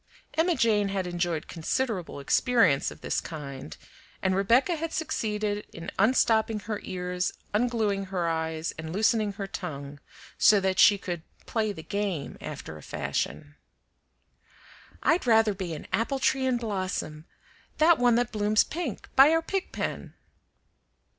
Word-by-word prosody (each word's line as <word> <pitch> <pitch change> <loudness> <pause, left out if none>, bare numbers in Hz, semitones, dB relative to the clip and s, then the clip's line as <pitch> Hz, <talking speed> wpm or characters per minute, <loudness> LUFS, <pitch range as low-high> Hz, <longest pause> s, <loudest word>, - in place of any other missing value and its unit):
Emma 335 +2 +2
Jane 210 -5 +2
had 195 -1 -1
enjoyed 175 -3 -2
considerable 185 - -2
experience 180 - +3
of - - -12
this - - -1
kind, 145 -3 -8 0.5
and 190 -1 +2
Rebecca 235 - +3
had 325 +1 -4
succeeded 210 -9 -2
in 165 +1 -7
unstopping 220 -1 +3
her 210 0 -4
ears, 180 0 -3 0.2
ungluing 210 -4 0
her 180 -3 -1
eyes, 160 0 -2
and 160 0 -5
loosening 215 +1 +2
her 195 0 -5
tongue, 145 -6 -6 0.4
so 210 -1 +6
that 190 -1 0
she 205 - +7
could 175 -4 -5 0.2
"play 220 -2 0
the 160 -5 -8
game" 200 -7 -3
after 80 - -7
a - - -13
fashion. 145 - -3 1.5
"I'd 320 -4 +2
rather 225 -2 +5
be 185 -4 -4
an 150 - -9
apple 255 +5 +1
tree 265 0 +1
in 255 -1 +2
blossom, 185 -8 -3 0.5
that 320 0 +5
one 245 -1 +4
that 245 0 +1
blooms 210 0 +3
pink, 315 - -5
by 270 +2 +8
our 325 +1 +2
pig 385 +2 -3
pen." - - -4
205 Hz, 145 wpm, -27 LUFS, 175-235 Hz, 1.5 s, by